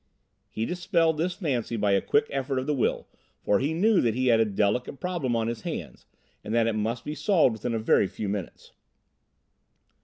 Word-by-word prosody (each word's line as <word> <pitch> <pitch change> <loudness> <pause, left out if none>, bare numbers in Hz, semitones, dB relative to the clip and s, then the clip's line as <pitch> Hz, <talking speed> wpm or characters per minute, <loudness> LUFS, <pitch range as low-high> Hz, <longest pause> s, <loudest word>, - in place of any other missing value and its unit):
He 110 - -3
dispelled 170 - +1
this 180 +2 -1
fancy 130 - -2
by 105 -1 +1
a 100 - +3
quick 220 +1 +2
effort 135 -1 -2
of 130 - -1
the 150 - 0
will, 130 - -1 0.4
for 100 - +3
he 145 +3 0
knew 210 +4 +3
that 115 -2 +1
he 130 0 +1
had 115 -1 +5
a 115 - +4
delicate 105 +6 -1
problem 170 -10 -2
on 115 -1 0
his 115 -1 -4
hands - - -6 0.4
and 110 - -3
that 115 -1 +3
it 115 - +1
must 115 +3 -2
be 150 - -3
solved 160 - +3
within 115 +2 -3
a - - -1
very 110 -2 +3
few 105 - -5
minutes. 100 -2 -5
125 Hz, 205 wpm, -26 LUFS, 110-160 Hz, 0.4 s, had